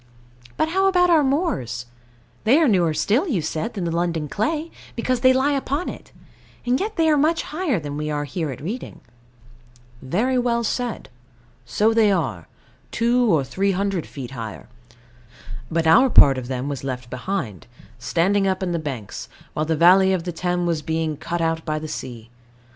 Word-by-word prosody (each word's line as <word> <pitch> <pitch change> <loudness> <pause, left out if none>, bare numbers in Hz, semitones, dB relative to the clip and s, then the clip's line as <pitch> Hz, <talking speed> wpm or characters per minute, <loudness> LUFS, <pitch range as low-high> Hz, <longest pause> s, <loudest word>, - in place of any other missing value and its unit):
But 315 - +1
how 385 +3 +2
about 360 -2 +4
our 315 -3 +5
moors? 265 - -1 0.6
They 245 +7 +5
are 320 -2 +4
newer 180 -7 +3
still, 215 - +1
you 200 - -1
said, 160 +11 -3
than 195 - -3
the 170 - -1
London 165 -2 -1
clay, 305 - -2 0.2
because 250 +1 0
they 255 +1 +5
lie 260 +3 +2
upon 280 +4 -1
it: - - -10 0.5
and 250 +2 +2
yet 430 +2 -3
they 325 -2 +2
are 305 -1 +4
much 315 +3 +2
higher 305 - -1
than 145 -2 -6
we 150 0 -3
are 145 -1 -1
here 155 +2 -3
at 130 - -7
Reading. 210 - -6 1.0
Very 225 - 0
well 235 -1 0
said: 240 0 -3 0.6
so 210 - +2
they 220 -2 +4
are, 125 - -2 0.4
two 240 0 +2
or 155 -5 +3
three 195 +9 0
hundred 195 -2 -1
feet 130 -3 -8
higher. 115 -5 -7 1.0
But 165 0 0
our 240 +12 +6
part 135 - +6
of 125 - -7
them 130 +1 -3
was 140 -3 -4
left 125 -2 -5
behind, 125 - -4 0.3
standing 195 +9 +1
up 190 0 -1
in 180 - -1
banks, 130 -9 -6 0.2
while 155 - -1
the 160 - +1
valley 190 +3 +6
of 180 -3 -1
the 175 - -3
Thames 175 +1 -1
was 165 -3 0
being 160 0 -2
cut 170 +3 -4
out 165 0 0
by 155 -1 -2
the 155 +1 -5
sea. 120 -5 -7
180 Hz, 180 wpm, -22 LUFS, 150-245 Hz, 1.0 s, our